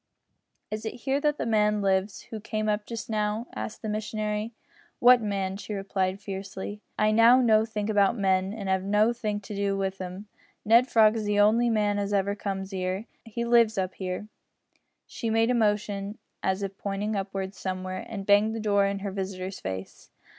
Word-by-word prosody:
"Is 215 Hz, 0 st, -4 dB
it 220 Hz, -, -4 dB
here 270 Hz, +3 st, 0 dB
that 295 Hz, -1 st, +1 dB
the -, -, -2 dB
man 210 Hz, -2 st, +2 dB
lives 195 Hz, +1 st, +1 dB
who 220 Hz, -, -4 dB
came 215 Hz, 0 st, -3 dB
up 210 Hz, 0 st, -1 dB
just 230 Hz, -1 st, -5 dB
now?" 215 Hz, +1 st, -1 dB
asked 215 Hz, -, -6 dB
the -, -, -3 dB
missionary. 215 Hz, 0 st, -2 dB, 0.5 s
"What 245 Hz, 0 st, +7 dB
man?" 195 Hz, -2 st, -2 dB
she 210 Hz, 0 st, -6 dB
replied, 195 Hz, -1 st, -1 dB
fiercely, 195 Hz, 0 st, -6 dB, 0.2 s
"I 215 Hz, 0 st, +3 dB
know 230 Hz, +3 st, +7 dB
nothink 220 Hz, -3 st, +2 dB
about 205 Hz, +1 st, +3 dB
men, 190 Hz, -1 st, +1 dB
an' 205 Hz, -2 st, -6 dB
'ave 190 Hz, 0 st, +1 dB
nothink 210 Hz, +1 st, +1 dB
to 205 Hz, -, -7 dB
do 200 Hz, 0 st, 0 dB
with 195 Hz, 0 st, -2 dB
'em. 185 Hz, +2 st, -6 dB, 0.4 s
Ned 230 Hz, +4 st, +6 dB
Frog's 220 Hz, -2 st, +4 dB
the 205 Hz, 0 st, +1 dB
on'y 220 Hz, +4 st, +4 dB
man 210 Hz, -2 st, +1 dB
as 200 Hz, 0 st, -2 dB
ever 200 Hz, 0 st, +1 dB
comes 195 Hz, -1 st, -4 dB
'ere, 185 Hz, 0 st, -1 dB
an' 210 Hz, -, -9 dB, 0.3 s
he 235 Hz, +2 st, -2 dB
lives 235 Hz, -2 st, +4 dB
up 185 Hz, -1 st, -2 dB
there." 185 Hz, +2 st, -4 dB, 0.8 s
She 230 Hz, -, -4 dB
made 225 Hz, +2 st, +3 dB
a -, -, +3 dB
motion, 210 Hz, -2 st, 0 dB, 0.2 s
as 190 Hz, +1 st, 0 dB
if 195 Hz, 0 st, -5 dB
pointing 205 Hz, +2 st, -2 dB
upwards 195 Hz, 0 st, -4 dB
somewhere, 185 Hz, 0 st, -4 dB
and 200 Hz, -3 st, -5 dB
banged 210 Hz, +2 st, +4 dB
the -, -, -3 dB
door 200 Hz, -2 st, +2 dB
in 200 Hz, 0 st, -2 dB
her 200 Hz, -, -2 dB
visitor's 190 Hz, -1 st, -4 dB
face. 95 Hz, 0 st, -7 dB
205 Hz, 185 wpm, -27 LUFS, 195-220 Hz, 0.8 s, What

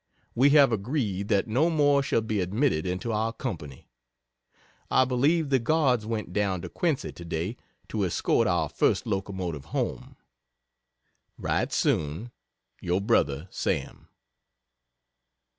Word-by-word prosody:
We 130 Hz, +4 st, +4 dB
have 140 Hz, -3 st, +6 dB
agreed 105 Hz, -3 st, -1 dB
that 100 Hz, 0 st, +1 dB
no 135 Hz, +10 st, +2 dB
more 145 Hz, -3 st, +3 dB
shall 135 Hz, -, +1 dB
be 110 Hz, -2 st, -1 dB
admitted 95 Hz, -, 0 dB
into 95 Hz, +6 st, -2 dB
our 110 Hz, +1 st, 0 dB
company. 75 Hz, -, -6 dB, 1.0 s
I 130 Hz, -, +4 dB
believe 140 Hz, +5 st, +2 dB
the 135 Hz, -, +4 dB
Guards 125 Hz, -4 st, +1 dB
went 110 Hz, -2 st, -3 dB
down 100 Hz, -4 st, 0 dB
to -, -, -6 dB
Quincy 160 Hz, -6 st, -1 dB
today 85 Hz, +5 st, -4 dB, 0.3 s
to 105 Hz, -2 st, -1 dB
escort 90 Hz, -, +1 dB
our -, -, +1 dB
first -, -, +1 dB
locomotive 95 Hz, -7 st, -3 dB
home. -, -, -3 dB, 1.2 s
Write -, -, -1 dB
soon. 80 Hz, +11 st, 0 dB, 0.5 s
Your 90 Hz, +2 st, 0 dB
Brother, 75 Hz, -5 st, +1 dB
SAM. -, -, -3 dB
110 Hz, 125 wpm, -27 LUFS, 90-130 Hz, 1.2 s, have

